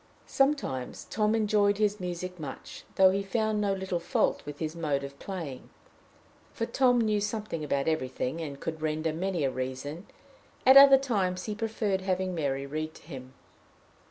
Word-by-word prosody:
Sometimes 270 Hz, -, 0 dB
Tom 215 Hz, +1 st, +2 dB
enjoyed 205 Hz, -2 st, +2 dB
his 210 Hz, 0 st, +1 dB
music 180 Hz, 0 st, -5 dB
much, 145 Hz, -4 st, -8 dB
though 190 Hz, -1 st, +6 dB
he 195 Hz, +1 st, 0 dB
found 215 Hz, +1 st, 0 dB
no 200 Hz, -1 st, +1 dB
little 190 Hz, -2 st, -2 dB
fault 170 Hz, -, 0 dB
with 145 Hz, -1 st, -6 dB
his 155 Hz, +1 st, -4 dB
mode 150 Hz, -4 st, -1 dB
of 140 Hz, 0 st, -9 dB
playing, 165 Hz, -10 st, -6 dB, 0.8 s
for 230 Hz, -, -2 dB
Tom 245 Hz, 0 st, +3 dB
knew 215 Hz, -2 st, +1 dB
something 210 Hz, -6 st, -3 dB
about 140 Hz, -1 st, -1 dB
everything, 130 Hz, 0 st, -2 dB
and 140 Hz, -3 st, -6 dB
could 160 Hz, +1 st, -5 dB
render 155 Hz, 0 st, -1 dB
many 180 Hz, -1 st, -1 dB
a 135 Hz, -, +1 dB
reason; 130 Hz, +7 st, -5 dB, 0.6 s
at 265 Hz, -, +8 dB
other 275 Hz, 0 st, +10 dB
times, 195 Hz, -9 st, -1 dB
he 215 Hz, -, -3 dB
preferred 215 Hz, -3 st, -1 dB
having 185 Hz, -1 st, -1 dB
Mary 140 Hz, -4 st, -2 dB
read 155 Hz, +2 st, -4 dB
to -, -, -15 dB
him. 130 Hz, -4 st, -10 dB
180 Hz, 165 wpm, -29 LUFS, 150-210 Hz, 0.8 s, other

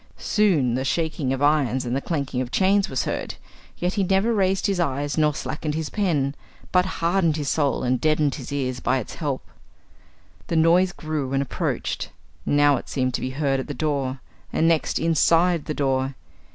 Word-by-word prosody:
Soon 170 Hz, -, +2 dB
the 130 Hz, +2 st, -1 dB
shaking 155 Hz, -1 st, -1 dB
of 135 Hz, +1 st, -1 dB
irons 135 Hz, -4 st, +2 dB
and 120 Hz, +1 st, -1 dB
the 135 Hz, -, -1 dB
clanking 140 Hz, -6 st, -2 dB
of 125 Hz, -, -4 dB
chains 195 Hz, +6 st, +2 dB
was 130 Hz, -, -1 dB
heard, -, -, -3 dB, 0.4 s
yet 180 Hz, +1 st, -1 dB
he 200 Hz, -, +1 dB
never 195 Hz, +5 st, +2 dB
raised 190 Hz, -2 st, +1 dB
his 195 Hz, -2 st, 0 dB
eyes 145 Hz, -2 st, -1 dB
nor 150 Hz, -2 st, +2 dB
slackened 150 Hz, -1 st, -3 dB
his 160 Hz, -1 st, -3 dB
pen, 150 Hz, -9 st, 0 dB, 0.4 s
but 180 Hz, 0 st, +3 dB
hardened 170 Hz, -2 st, +2 dB
his 145 Hz, -3 st, -2 dB
soul 145 Hz, -2 st, +1 dB
and 125 Hz, -1 st, 0 dB
deadened 155 Hz, -2 st, +2 dB
his 130 Hz, -2 st, -7 dB
ears 130 Hz, -3 st, -2 dB
by -, -, +1 dB
its 125 Hz, -, -5 dB
help. 145 Hz, -4 st, -3 dB, 1.0 s
The -, -, -2 dB
noise 170 Hz, +3 st, +4 dB
grew 155 Hz, -6 st, -4 dB
and 135 Hz, 0 st, +2 dB
approached: 140 Hz, -, -3 dB, 0.4 s
now 145 Hz, -1 st, +4 dB
it -, -, -8 dB
seemed 130 Hz, -2 st, -1 dB
to -, -, -2 dB
be 130 Hz, -, -2 dB
heard 135 Hz, 0 st, 0 dB
at 130 Hz, -, -5 dB
the 145 Hz, -, -5 dB
door, 135 Hz, -2 st, -2 dB, 0.3 s
and 165 Hz, -, +2 dB
next 165 Hz, -2 st, +2 dB
inside 165 Hz, +1 st, +3 dB
the 155 Hz, -, -3 dB
door. 135 Hz, -1 st, 0 dB
150 Hz, 190 wpm, -24 LUFS, 135-170 Hz, 1.0 s, noise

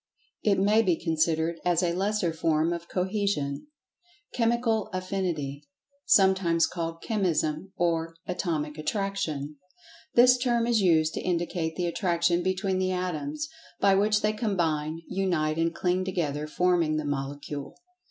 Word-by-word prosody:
It 205 Hz, -2 st, +2 dB
may 210 Hz, +3 st, +4 dB
be 185 Hz, -6 st, +2 dB
considered 160 Hz, 0 st, 0 dB
as 175 Hz, 0 st, +2 dB
a 170 Hz, -1 st, +1 dB
"lesser" 195 Hz, -2 st, 0 dB
form 160 Hz, 0 st, +1 dB
of 170 Hz, 0 st, -7 dB
cohesion. 185 Hz, -, -1 dB, 0.7 s
Chemical 230 Hz, -2 st, +1 dB
Affinity 175 Hz, -7 st, -3 dB, 0.4 s
(sometimes 190 Hz, -4 st, +4 dB
called 165 Hz, -1 st, -5 dB
Chemism 180 Hz, -4 st, -1 dB
or 165 Hz, -1 st, 0 dB
Atomic 155 Hz, -4 st, -2 dB
Attraction): 155 Hz, -4 st, -2 dB, 0.6 s
This 250 Hz, +1 st, +7 dB
term 240 Hz, -2 st, +1 dB
is 235 Hz, -2 st, +2 dB
used 160 Hz, -4 st, +3 dB
to -, -, -3 dB
indicate 170 Hz, -2 st, -1 dB
the 180 Hz, -, -1 dB
attraction 170 Hz, -1 st, +1 dB
between 185 Hz, +1 st, 0 dB
the 185 Hz, 0 st, 0 dB
atoms, 185 Hz, -, -3 dB, 0.3 s
by 195 Hz, -1 st, +4 dB
which 210 Hz, +2 st, +3 dB
they 210 Hz, 0 st, +2 dB
combine, 165 Hz, -7 st, -1 dB
unite 170 Hz, -5 st, 0 dB
and 165 Hz, 0 st, +2 dB
cling 180 Hz, +2 st, 0 dB
together, 155 Hz, -6 st, -2 dB
forming 170 Hz, -1 st, +1 dB
the 155 Hz, -, -2 dB
Molecule. 145 Hz, 0 st, -4 dB
175 Hz, 135 wpm, -27 LUFS, 160-195 Hz, 0.7 s, This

